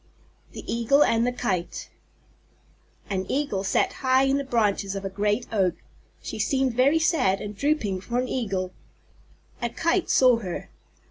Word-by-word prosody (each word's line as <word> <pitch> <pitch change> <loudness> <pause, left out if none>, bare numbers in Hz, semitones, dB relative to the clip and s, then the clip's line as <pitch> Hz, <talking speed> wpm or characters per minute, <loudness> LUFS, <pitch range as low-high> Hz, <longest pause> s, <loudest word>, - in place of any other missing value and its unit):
_ - - -27
THE - - -8
EAGLE 235 +5 +3
AND 230 -2 +2
THE - - +1
KITE 185 -8 -3 1.2
An 190 -2 -2
Eagle 270 -9 -1
sat 195 - +1
high 260 0 +4
in 270 +1 +2
the - - -2
branches 205 -6 0
of 195 0 -5
a 195 - -3
great 205 +4 0
Oak. 185 -5 +2 0.5
She - - -6
seemed 265 -3 +1
very 265 +6 +4
sad 315 - +2
and 210 0 -6
drooping 215 -8 0
for 235 +5 -3
an 250 +1 0
Eagle. 195 -8 -2 0.9
A 235 - 0
Kite 335 +8 0
saw 255 -2 +5
her. 185 -6 -6
235 Hz, 160 wpm, -25 LUFS, 195-265 Hz, 1.2 s, saw